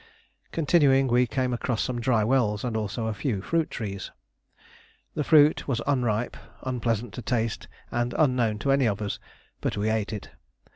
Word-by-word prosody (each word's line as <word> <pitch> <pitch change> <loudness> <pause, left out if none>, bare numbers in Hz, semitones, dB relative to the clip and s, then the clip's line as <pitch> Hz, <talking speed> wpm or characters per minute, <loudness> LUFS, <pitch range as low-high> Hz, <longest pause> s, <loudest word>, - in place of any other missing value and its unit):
Continuing, 140 -4 +4
we 125 0 +3
came 130 0 -1
across 120 -1 -1
some 120 -2 -2
dry 115 -3 +2
wells 110 -3 +1
and 120 -3 -2
also 110 +1 -2
a 110 - -1
few 105 -1 -2
fruit 165 - 0
trees. 100 -4 -5 1.0
The 150 - -1
fruit 150 0 +5
was 130 -4 0
unripe, 120 -5 0 0.3
unpleasant 120 -3 -1
to 125 - -6
taste, 115 -2 -1 0.2
and 120 +1 -1
unknown 125 -7 +2
to 140 - +3
any 135 -3 +4
of 100 -1 -1
us; 105 -2 -3 0.4
but - - -2
we 105 +2 +1
ate 110 -1 -1
it. 105 -3 -6
120 Hz, 165 wpm, -26 LUFS, 110-135 Hz, 1.0 s, fruit